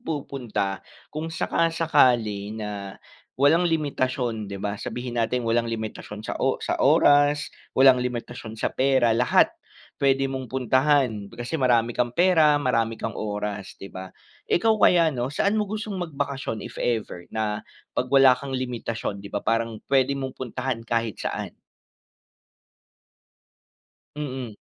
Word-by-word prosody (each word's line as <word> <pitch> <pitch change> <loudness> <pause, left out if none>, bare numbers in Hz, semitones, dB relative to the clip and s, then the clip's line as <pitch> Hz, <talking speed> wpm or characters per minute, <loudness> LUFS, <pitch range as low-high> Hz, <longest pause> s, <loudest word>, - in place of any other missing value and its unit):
pupunta? 130 - -3 0.3
Kung 155 +2 -4
saka-sakali 125 -11 +1
na 100 -2 -6 0.4
walang 165 +6 +4
limitasyon, 130 -8 -1
di 100 - -5
ba, 100 +1 -4
sabihin 120 -1 -3
natin 125 +2 0
walang 115 0 +1
limitasyon 110 -1 -6
sa - - -4
o - - +2
sa - - -1
oras. 145 +1 +4 0.2
Walang 130 -1 +7
limitasyon 120 -2 -5
sa - - -2
pera, 130 -3 +3
lahat. 120 +2 +3 0.5
Puwede 135 -1 +2
mong 130 -1 -4
puntahan 130 -3 +1
kasi 120 +7 -4
marami 120 -3 +3
kang 120 0 -1
pera, 165 -3 +5
marami 115 -5 +1
kang 115 0 -5
oras, 105 -2 -4
di 95 - -8
ba? 95 0 -8 0.4
Ikaw, 220 +5 +3
kaya, 170 -4 +5
ano, 125 -4 -2
saan 200 +8 +1
mo 210 - 0
gustong 210 -1 -4
magbakasyon 140 - -3
if - - -9
ever, 110 -7 -2
na 105 -1 -2 0.3
pag 125 - 0
wala 135 -2 +7
kang 140 -1 -6
limitasyon, 120 -5 -3
di 100 - -9
ba 100 - -3
parang 115 -1 -1
puwede 135 0 +3
mong 135 -1 -4
puntahan 125 -1 -3
kahit 115 -2 -1
saan. - - -3 2.7
Mm. 130 -7 -5
125 Hz, 135 wpm, -25 LUFS, 110-140 Hz, 2.7 s, Walang